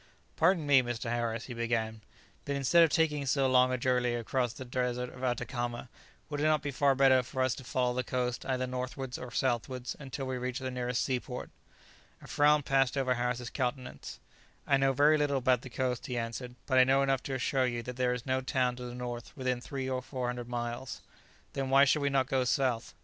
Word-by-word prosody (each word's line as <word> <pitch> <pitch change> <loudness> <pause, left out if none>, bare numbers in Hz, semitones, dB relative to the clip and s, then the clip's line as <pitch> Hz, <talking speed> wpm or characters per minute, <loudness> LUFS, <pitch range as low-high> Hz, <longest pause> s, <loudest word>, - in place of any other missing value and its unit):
"Pardon 165 -1 +3
me, 140 -2 +6
Mr. 120 -1 -4
Harris," 115 -1 -2
he 125 - -7
began, 115 -2 -2 0.4
"but 140 - -2
instead 140 +5 +4
of 165 - +4
taking 150 -3 +1
so 135 0 +2
long 130 0 +4
a 130 - 0
journey 125 -1 +1
across 120 +1 -1
the 130 - -9
desert 125 0 -2
of 130 - -10
Atacama, 120 -1 -2 0.4
would 145 -1 -4
it 150 - +1
not 155 0 +3
be 145 - -2
far 140 +1 +3
better 130 -1 +5
for 130 +1 -2
us 130 -2 +1
to 130 - -9
follow 125 -1 0
the 125 +1 -1
coast 125 0 -2
either 130 -1 0
northwards 125 0 -4
or 125 - -7
southwards, 125 0 -2
until 135 -1 -5
we 130 -1 -3
reach 125 0 -3
the 130 -1 -4
nearest 125 -1 -1
seaport?" 125 -1 -3 0.7
A - - -14
frown 150 0 +3
passed 135 0 +2
over 130 -2 +2
Harris's 125 0 -2
countenance. 125 -1 -4 0.5
"I 140 - +3
know 135 0 +3
very 150 +3 +4
little 145 -1 +1
about 130 -2 +2
the 130 - -9
coast," 125 -1 -2
he 125 - -3
answered; 120 +2 -4
"but 130 -2 +3
I - - +9
know 135 +1 +3
enough 135 -1 +1
to 135 - -4
assure 130 0 +1
you 120 -1 -3
that 125 +1 -6
there 125 -1 +1
is 125 - -7
no 130 0 0
town 130 -2 0
to 125 - -6
the 120 0 -7
north 120 -1 -6
within 130 -2 -1
300 130 0 -4
or 130 - -2
400 125 -2 -4
miles." 120 +1 -4 0.5
"Then 135 -1 -2
why 135 +1 +6
should 145 +2 +2
we 140 - +1
not 135 -1 +2
go 130 0 +1
south?" 125 -2 0
130 Hz, 215 wpm, -31 LUFS, 125-135 Hz, 0.7 s, I